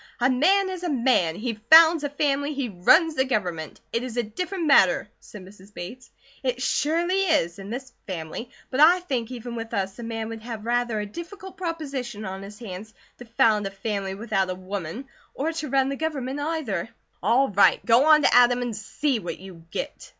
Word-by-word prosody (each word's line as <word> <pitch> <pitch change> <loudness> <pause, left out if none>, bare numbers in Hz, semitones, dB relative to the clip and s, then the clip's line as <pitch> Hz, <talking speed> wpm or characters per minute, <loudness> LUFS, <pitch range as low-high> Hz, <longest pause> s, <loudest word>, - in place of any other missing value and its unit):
"A 250 +2 +3
man 375 +9 +3
is 365 -2 -6
a 355 - -2
man! 235 - +2
He 225 +2 -4
founds 320 0 +8
a 290 - -1
family, 285 0 -1
he 270 -3 -2
runs 315 - +4
the 265 - +2
Government! 180 - -3
It 230 - 0
is 245 -2 -6
a 240 - +2
different 350 - -4
matter," 195 - +4
said 200 -4 -12
Mrs. 195 +1 -16
Bates. 240 +9 -8 0.3
"It 255 -2 -2
surely 335 +8 +1
is; 200 - +1
in 195 +1 -8
this 255 +3 -6
family. 180 +6 -6 0.2
But 260 - -2
I 345 +4 +7
think, 255 -9 -3
even 245 -1 -7
with 230 0 -5
us, 195 +2 -3
a - - -6
man 225 -1 -4
would 225 -1 -7
have 225 -2 -7
rather 240 -2 0
a 210 - -3
difficult 355 - -9
proposition 280 - -5
on 190 0 -6
his 200 +1 -10
hands 215 -1 -9 0.2
to 245 - -10
found 220 -3 +2
a - - -4
family 195 -1 -4
without 195 -3 -1
a 185 - -2
woman; 185 - -6 0.3
or 320 +4 -2
to 310 -2 -4
run 270 0 +2
the 275 - -2
Government 280 -3 -3
either." 290 - -2 0.3
"All 240 +8 +3
right! 200 0 +4
Go 240 +3 +5
on 305 -1 +6
to - - +4
Adam 245 0 +5
and 240 -3 -4
see 245 +5 -1
what 175 - -6
you 180 -3 -13
get." - - -6
240 Hz, 200 wpm, -25 LUFS, 205-290 Hz, 0.3 s, founds